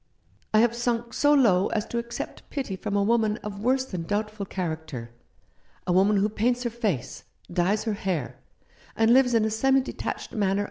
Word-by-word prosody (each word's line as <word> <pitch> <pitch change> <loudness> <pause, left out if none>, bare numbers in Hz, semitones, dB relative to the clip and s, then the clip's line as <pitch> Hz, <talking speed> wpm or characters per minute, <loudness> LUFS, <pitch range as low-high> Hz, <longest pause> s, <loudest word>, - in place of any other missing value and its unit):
I 215 - +5
have 235 0 +3
sunk 235 -1 -1
so 290 - +3
low 210 -10 +4
as 215 -2 -1
to 235 - -3
accept 235 0 -6
pity 265 -9 -3
from 205 +2 -4
a 200 - +3
woman 220 -1 +2
of 205 -1 -6
worse 260 +3 +2
than 185 -9 -5
doubtful 205 +2 -3
character 160 -11 -5 0.4
— - - -36
a 180 - +1
woman 200 +3 +4
who 200 +1 +3
paints 240 +4 0
her 240 - -2
face, 210 - -3 0.3
dyes 185 +4 +1
her 220 - -1
hair, 165 - -3 0.6
and 225 +1 +4
lives 250 -2 +4
in 220 -1 +3
a 220 - -1
semi 270 +5 +3
detached 260 - -5
manner 220 - -5
19 200 - +2
Rough 195 - +1
Justice. - - 0
215 Hz, 205 wpm, -26 LUFS, 195-235 Hz, 0.6 s, I